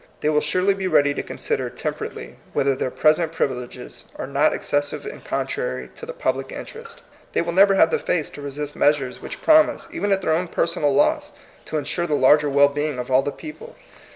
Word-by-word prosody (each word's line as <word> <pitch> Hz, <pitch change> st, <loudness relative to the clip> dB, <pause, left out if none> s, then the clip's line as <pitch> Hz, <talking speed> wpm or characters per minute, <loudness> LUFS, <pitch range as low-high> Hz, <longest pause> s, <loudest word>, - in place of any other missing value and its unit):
They 150 Hz, -, +1 dB
will 150 Hz, -1 st, +3 dB
surely 185 Hz, +6 st, +2 dB
be 195 Hz, -1 st, -3 dB
ready 145 Hz, -5 st, +3 dB
to -, -, -3 dB
consider -, -, -3 dB
temperately -, -, -6 dB, 0.2 s
whether 135 Hz, 0 st, +2 dB
their 130 Hz, -, -2 dB
present 155 Hz, +4 st, +2 dB
privileges 125 Hz, -5 st, -4 dB
are -, -, -5 dB
not 140 Hz, +3 st, +2 dB
excessive 145 Hz, -, -2 dB
and 430 Hz, -, -8 dB
contrary -, -, -3 dB
to 465 Hz, -, -10 dB
the -, -, -4 dB
public -, -, -2 dB
interest. 460 Hz, 0 st, -8 dB, 0.3 s
They -, -, +2 dB
will 170 Hz, 0 st, -3 dB
never 195 Hz, +2 st, +6 dB
have 165 Hz, -, +5 dB
the -, -, +1 dB
face 165 Hz, -4 st, -1 dB
to 145 Hz, -, -10 dB
resist 145 Hz, +1 st, -5 dB
measures 140 Hz, -4 st, +1 dB
which -, -, -8 dB
promise, 315 Hz, 0 st, +4 dB
even 270 Hz, -12 st, -2 dB
at 195 Hz, -1 st, +1 dB
their 160 Hz, -, +2 dB
own 175 Hz, +3 st, 0 dB
personal 165 Hz, -4 st, +1 dB
loss, 295 Hz, -, +1 dB, 0.3 s
to 155 Hz, -, -2 dB
insure 165 Hz, +4 st, -2 dB
the 150 Hz, -, +1 dB
larger 145 Hz, +2 st, +5 dB
well 140 Hz, +1 st, +5 dB
being 145 Hz, -1 st, -2 dB
of 125 Hz, +1 st, -5 dB
all 130 Hz, +1 st, +5 dB
the 145 Hz, -, -3 dB
people. 390 Hz, -, -10 dB
155 Hz, 205 wpm, -22 LUFS, 145-195 Hz, 0.3 s, never